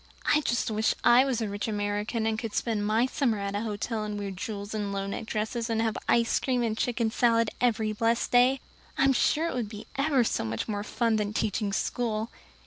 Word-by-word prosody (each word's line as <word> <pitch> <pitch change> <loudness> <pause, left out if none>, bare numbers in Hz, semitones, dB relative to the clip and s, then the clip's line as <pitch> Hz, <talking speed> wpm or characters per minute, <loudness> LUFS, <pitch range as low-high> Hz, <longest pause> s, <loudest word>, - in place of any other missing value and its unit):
"I 300 - +4
just 240 -5 0
wish 215 +1 +1
I 240 +2 +7
was 255 -4 -1
a - - -1
rich 205 +2 -3
American 210 +2 -1
and 220 0 0
could 225 -3 -5
spend 215 -3 0
my 220 +3 +3
summer 255 -4 0
at 200 0 -3
a 205 - -1
hotel 215 0 -3
and 210 -1 -4
wear 200 -1 -4
jewels 200 +2 -5
and 205 -2 -2
low 195 0 -2
necked 200 +3 -5
dresses 225 +2 -2
and 225 -1 0
have 225 -1 0
ice 235 0 +3
cream 250 -2 0
and 220 -2 0
chicken 230 -1 0
salad 230 -2 +2
every 220 -3 +1
blessed 230 +2 0
day. 250 +2 +4 0.4
I'm 270 0 +4
sure 310 +5 +2
it - - -3
would 235 -5 -2
be 215 0 -8
ever 275 -2 +3
so - - -1
much 110 0 -3
more 205 -2 -2
fun 225 +1 0
than 210 0 -2
teaching 210 -1 -1
school. 220 +2 -1
220 Hz, 220 wpm, -28 LUFS, 210-240 Hz, 0.4 s, I